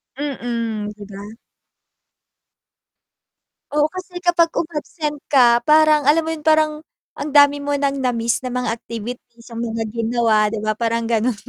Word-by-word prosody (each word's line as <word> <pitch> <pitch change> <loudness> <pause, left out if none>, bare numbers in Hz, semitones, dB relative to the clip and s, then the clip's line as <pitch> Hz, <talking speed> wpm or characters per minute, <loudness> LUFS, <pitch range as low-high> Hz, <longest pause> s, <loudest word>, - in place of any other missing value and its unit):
Mm. 230 -6 -3
'Di 205 - -11
ba? 205 +3 -10 2.4
Oo. 295 0 +3
Kasi 370 -1 -9
kapag 340 -1 +3
um-absent 305 -2 -3
ka 240 -4 +5
parang 305 -2 +5
alam 320 +2 +4
mo 320 - -3
'yun? 320 - -4
Parang, 310 -1 +3 0.4
ang 290 0 -4
dami 285 0 +6
mo 285 0 -2
ng 280 -1 -1
na-miss 235 -2 0
na 250 - -4
mga 250 -2 -1
activities 235 +1 -9
yung 230 - -6
mga 225 -1 -3
ginawa. 225 -2 +1
'Di 220 0 -3
ba 215 - +1
parang 230 0 -1
ganun. 230 0 +1
250 Hz, 145 wpm, -20 LUFS, 230-300 Hz, 2.4 s, dami